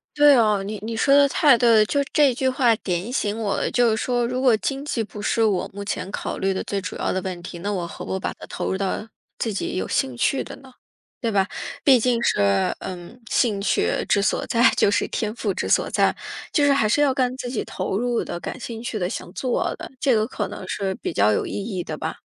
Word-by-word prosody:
对 290 Hz, -1 st, +7 dB
啊， 210 Hz, -4 st, +3 dB
你 210 Hz, +2 st, -5 dB
你 225 Hz, +1 st, -4 dB
说 275 Hz, +3 st, +4 dB
得 285 Hz, 0 st, +6 dB
太 275 Hz, -2 st, +5 dB
对 235 Hz, +1 st, +3 dB
了， 215 Hz, -2 st, +6 dB
就 285 Hz, +5 st, +1 dB
这 290 Hz, -4 st, +5 dB
句 260 Hz, +2 st, 0 dB
话 250 Hz, -3 st, +3 dB
点 185 Hz, +3 st, -3 dB
醒 210 Hz, -5 st, -1 dB
我 205 Hz, -3 st, -1 dB
了， -, -, 0 dB
就 245 Hz, -1 st, +3 dB
是 220 Hz, -, 0 dB
说 245 Hz, -1 st, 0 dB
如 255 Hz, +1 st, -2 dB
果 250 Hz, -4 st, +5 dB
经 275 Hz, +5 st, -3 dB
济 235 Hz, -6 st, -1 dB
不 210 Hz, -1 st, -9 dB
是 225 Hz, +2 st, +1 dB
我 205 Hz, -4 st, +1 dB
目 200 Hz, 0 st, -6 dB
前 185 Hz, -2 st, -3 dB
考 -, -, -4 dB
虑 195 Hz, 0 st, 0 dB
的 190 Hz, -, -3 dB
最 200 Hz, -1 st, -3 dB
主 185 Hz, -, -6 dB
要 -, -, -1 dB
的 185 Hz, -, -1 dB
问 185 Hz, -2 st, -5 dB
题， 175 Hz, -1 st, -8 dB
那 205 Hz, +4 st, -3 dB
我 175 Hz, -3 st, -2 dB
何 -, -, -8 dB
不 190 Hz, -, -3 dB
把 -, -, -3 dB
它 -, -, -11 dB
投 -, -, -3 dB
入 190 Hz, -, -1 dB
到 195 Hz, +2 st, -2 dB, 0.3 s
自 225 Hz, -, -1 dB
己 195 Hz, -, -3 dB
有 -, -, -2 dB
兴 130 Hz, -2 st, -1 dB
趣 270 Hz, -, +1 dB
的 -, -, -9 dB
呢？ 265 Hz, -2 st, -16 dB, 0.5 s
对 230 Hz, -3 st, 0 dB
吧？ 195 Hz, -1 st, +2 dB, 0.4 s
毕 260 Hz, -4 st, +6 dB
竟 240 Hz, 0 st, +1 dB
是， 100 Hz, -1 st, +2 dB
嗯， 185 Hz, +6 st, -8 dB
兴 215 Hz, -6 st, +2 dB
趣 -, -, +1 dB, 0.2 s
之 200 Hz, -, +3 dB
所 200 Hz, -, 0 dB
在， 235 Hz, +2 st, +5 dB
就 200 Hz, -, +4 dB
是 205 Hz, -, +1 dB
天 215 Hz, -1 st, -2 dB
赋 210 Hz, -5 st, -1 dB
之 -, -, -3 dB
所 -, -, +3 dB
在， -, -, +2 dB, 0.4 s
就 295 Hz, -, +3 dB
是 285 Hz, -, +5 dB
还 230 Hz, -6 st, +2 dB
是 290 Hz, -, +3 dB
要 280 Hz, -2 st, +3 dB
干 255 Hz, -1 st, 0 dB
自 245 Hz, -, -5 dB
己 245 Hz, -, -2 dB
投 190 Hz, +1 st, -3 dB
入 240 Hz, 0 st, 0 dB
的、 175 Hz, -, -5 dB
感 255 Hz, -, -6 dB
兴 230 Hz, -1 st, -6 dB
趣 235 Hz, -4 st, -3 dB
的、 180 Hz, 0 st, -1 dB
想 -, -, -6 dB
做 250 Hz, +3 st, -1 dB
的， -, -, -8 dB
这 265 Hz, -5 st, +3 dB
个 215 Hz, 0 st, +1 dB
可 -, -, -3 dB
能 -, -, -8 dB
是 195 Hz, -1 st, -2 dB
比 -, -, -4 dB
较 105 Hz, +1 st, +3 dB
有 -, -, 0 dB
意 -, -, -6 dB
义 200 Hz, -3 st, -3 dB
的 -, -, -5 dB
吧。 -, -, -4 dB
220 Hz, 275 characters per minute, -23 LUFS, 195-250 Hz, 0.5 s, 对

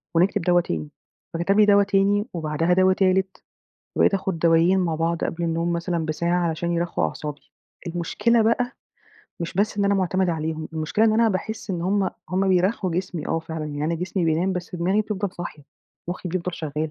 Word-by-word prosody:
ونكتب 190 Hz, +3 st, +3 dB
دوا 175 Hz, +1 st, +3 dB
تاني." 80 Hz, -, -4 dB, 0.4 s
فكتب 195 Hz, +5 st, +1 dB
لي 210 Hz, -, +7 dB
دوا 200 Hz, -1 st, +6 dB
تاني، 200 Hz, +1 st, +2 dB
وبعدها 165 Hz, +1 st, 0 dB
دوا 185 Hz, +1 st, +4 dB
تالت، 190 Hz, 0 st, +1 dB, 0.5 s
وبقيت -, -, +4 dB
آخُد 190 Hz, -3 st, -1 dB
دوائين 170 Hz, +3 st, +4 dB
مع 170 Hz, -3 st, 0 dB
بعض 165 Hz, +1 st, 0 dB
قبل 170 Hz, +1 st, -2 dB
النوم 170 Hz, +1 st, 0 dB
مثلًا 170 Hz, -1 st, -1 dB
بساعة، 170 Hz, +2 st, 0 dB
عشان 170 Hz, +2 st, -2 dB
يرخُّوا 170 Hz, 0 st, -1 dB
أعصابي. 150 Hz, -1 st, -7 dB, 0.4 s
المشكلة 210 Hz, +7 st, +1 dB
بقى، 245 Hz, +3 st, +1 dB, 0.7 s
مش 170 Hz, -, -4 dB
بس 205 Hz, +2 st, 0 dB
إن 200 Hz, -, +2 dB
أنا 200 Hz, 0 st, +3 dB
معتمدة 185 Hz, -1 st, +1 dB
عليهم، 160 Hz, 0 st, -3 dB
المشكلة 160 Hz, +7 st, +1 dB
إن 220 Hz, -, +4 dB
أنا 225 Hz, 0 st, +4 dB
باحس 220 Hz, +2 st, -3 dB
إن 170 Hz, -2 st, -2 dB
هم 195 Hz, 0 st, +1 dB, 0.2 s
هم 190 Hz, +1 st, +1 dB
بيرخّوا 185 Hz, +1 st, +2 dB
جسمي 175 Hz, -2 st, -3 dB
آه 165 Hz, -, +1 dB
فعلًا 160 Hz, -1 st, -5 dB
يعني، 145 Hz, 0 st, -4 dB
أنا 165 Hz, +2 st, 0 dB
جسمي 180 Hz, +1 st, -2 dB
بينام 165 Hz, +4 st, +1 dB
بس 180 Hz, 0 st, -5 dB
دماغي 190 Hz, +5 st, +1 dB
بتفضَل 200 Hz, -2 st, -3 dB
صاحية، 170 Hz, -4 st, -7 dB, 0.5 s
مخي 180 Hz, 0 st, -4 dB
بيفضل 180 Hz, 0 st, -3 dB
شغّال. 155 Hz, 0 st, -3 dB
175 Hz, 185 wpm, -23 LUFS, 165-195 Hz, 0.7 s, لي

